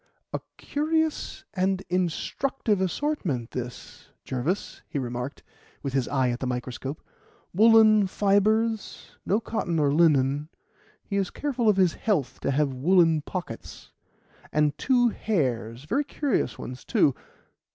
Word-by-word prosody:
"A -, -, -1 dB, 0.2 s
curious 315 Hz, +1 st, -1 dB
and 190 Hz, 0 st, 0 dB
instructive 190 Hz, -, -1 dB
assortment 185 Hz, -, -1 dB
this, 125 Hz, -1 st, -7 dB, 0.2 s
Jervis," 140 Hz, +10 st, -2 dB
he -, -, -3 dB
remarked, 125 Hz, +1 st, -4 dB, 0.4 s
with 140 Hz, -2 st, -3 dB
his 135 Hz, -3 st, +1 dB
eye 130 Hz, -3 st, +1 dB
at 120 Hz, -, -4 dB
the 130 Hz, -, -2 dB
microscope: 125 Hz, +4 st, -4 dB, 0.5 s
"woollen 215 Hz, 0 st, +6 dB
fibres 215 Hz, +3 st, +1 dB
no 205 Hz, -, +3 dB
cotton 210 Hz, -7 st, -2 dB
or 145 Hz, -2 st, +2 dB
linen; 145 Hz, -2 st, +3 dB, 0.5 s
he 200 Hz, -, -3 dB
is 195 Hz, -2 st, 0 dB
careful 255 Hz, -6 st, 0 dB
of 205 Hz, -, +3 dB
his 185 Hz, -3 st, +4 dB
health 145 Hz, -, -1 dB
to -, -, -2 dB
have 140 Hz, 0 st, +1 dB
woollen 165 Hz, +3 st, +4 dB
pockets 155 Hz, -8 st, -7 dB, 0.6 s
and 150 Hz, -1 st, +2 dB
two 245 Hz, -, +3 dB
hairs; 125 Hz, -, -1 dB
very 270 Hz, -, 0 dB
curious 290 Hz, -1 st, -1 dB
ones, 125 Hz, 0 st, -8 dB
too. 140 Hz, -, +3 dB
175 Hz, 130 wpm, -26 LUFS, 135-215 Hz, 0.6 s, woollen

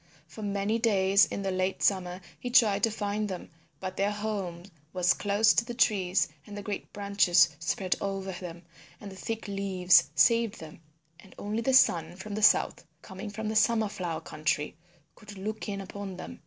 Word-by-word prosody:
For 220 Hz, -, -11 dB
many 205 Hz, +2 st, -1 dB
days 200 Hz, -3 st, +4 dB
in 200 Hz, -, -5 dB
the 195 Hz, -, -1 dB
late 185 Hz, +1 st, -1 dB
summer 185 Hz, -2 st, 0 dB, 0.2 s
he 245 Hz, -, -5 dB
tried 210 Hz, -4 st, +4 dB
to -, -, -1 dB
find 210 Hz, 0 st, -2 dB
them 185 Hz, -3 st, -7 dB, 0.3 s
but 185 Hz, 0 st, -6 dB
their 200 Hz, +1 st, +1 dB
home 205 Hz, -5 st, -4 dB, 0.3 s
was 180 Hz, -1 st, +3 dB
close 210 Hz, +2 st, +3 dB
to -, -, +2 dB
the 240 Hz, +1 st, -7 dB
trees, 190 Hz, -6 st, +2 dB, 0.2 s
and 205 Hz, -1 st, -8 dB
the 205 Hz, -, -6 dB
great 205 Hz, 0 st, -5 dB
branches 200 Hz, -5 st, +3 dB
spread 175 Hz, +3 st, -1 dB
over 195 Hz, -1 st, -3 dB
them 175 Hz, -1 st, -8 dB, 0.4 s
and 205 Hz, -2 st, -9 dB
the -, -, -10 dB
thick 225 Hz, +3 st, -5 dB
leaves 195 Hz, -2 st, +3 dB
saved 230 Hz, -2 st, +3 dB
them, 160 Hz, 0 st, -11 dB, 0.4 s
and 185 Hz, -, -17 dB
only 210 Hz, +3 st, -3 dB
the 260 Hz, +3 st, +2 dB
sun 170 Hz, -9 st, +4 dB
from 205 Hz, +3 st, -8 dB
the 215 Hz, -, -3 dB
south, 215 Hz, -, +4 dB, 0.2 s
coming 190 Hz, +2 st, -8 dB
from 220 Hz, +1 st, -5 dB
the 220 Hz, -, -2 dB
Summer 220 Hz, -1 st, +3 dB
Flower 170 Hz, -5 st, -4 dB
country, 150 Hz, -1 st, -2 dB, 0.4 s
could 210 Hz, -1 st, -13 dB
look 215 Hz, +3 st, -5 dB
in 200 Hz, -1 st, -3 dB
upon 195 Hz, -1 st, -7 dB
them. -, -, -9 dB
200 Hz, 185 wpm, -28 LUFS, 185-215 Hz, 0.4 s, days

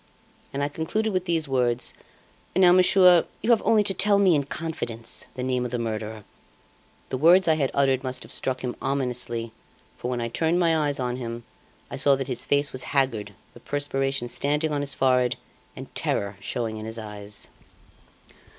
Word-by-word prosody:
And 140 Hz, +1 st, -2 dB
I -, -, +1 dB
concluded 200 Hz, +9 st, -2 dB
with 185 Hz, -1 st, 0 dB
these 165 Hz, -3 st, 0 dB
words: 125 Hz, -3 st, 0 dB, 0.6 s
'Now, 185 Hz, -1 st, +6 dB
monsieur, 180 Hz, -1 st, +6 dB, 0.2 s
you 240 Hz, -, +3 dB
have 230 Hz, -, +5 dB
only 215 Hz, -2 st, +4 dB
to 195 Hz, -, 0 dB
tell 200 Hz, +2 st, +3 dB
me 195 Hz, -3 st, +5 dB
in 145 Hz, -3 st, +1 dB
confidence 135 Hz, -8 st, -5 dB
the 125 Hz, -, -4 dB
name 125 Hz, -1 st, 0 dB
of 125 Hz, -, -3 dB
the 120 Hz, -, -2 dB
murderer!' 110 Hz, -2 st, -4 dB, 0.9 s
The 130 Hz, -, -3 dB
words 175 Hz, +5 st, +6 dB
I 160 Hz, -, +5 dB
had 145 Hz, -4 st, 0 dB
uttered 135 Hz, -1 st, +2 dB
must 130 Hz, -1 st, -4 dB
have -, -, -13 dB
struck 130 Hz, -1 st, -1 dB
him 125 Hz, -1 st, -3 dB
ominously, 125 Hz, -4 st, -2 dB, 0.5 s
for 125 Hz, -, -3 dB
when 125 Hz, -1 st, -2 dB
I 115 Hz, -, -1 dB
turned 160 Hz, +8 st, +1 dB
my 165 Hz, -2 st, +3 dB
eyes 145 Hz, -3 st, 0 dB
on 125 Hz, -1 st, -2 dB
him, 120 Hz, -1 st, -5 dB, 0.5 s
I -, -, -4 dB
saw 140 Hz, -1 st, +4 dB
that 135 Hz, -1 st, -4 dB
his 125 Hz, -3 st, -2 dB
face 145 Hz, 0 st, +2 dB
was 130 Hz, -1 st, -3 dB
haggard, 125 Hz, -6 st, 0 dB, 0.2 s
the -, -, -14 dB
perspiration 135 Hz, -3 st, -1 dB
standing 150 Hz, +5 st, 0 dB
on 145 Hz, -1 st, 0 dB
his 140 Hz, -1 st, -2 dB
forehead, 125 Hz, -2 st, +2 dB, 0.4 s
and -, -, -10 dB
terror 100 Hz, 0 st, -1 dB
showing 110 Hz, +1 st, -3 dB
in 110 Hz, -, -6 dB
his 110 Hz, +1 st, -6 dB
eyes. 105 Hz, -1 st, -7 dB
135 Hz, 185 wpm, -25 LUFS, 120-160 Hz, 0.9 s, Now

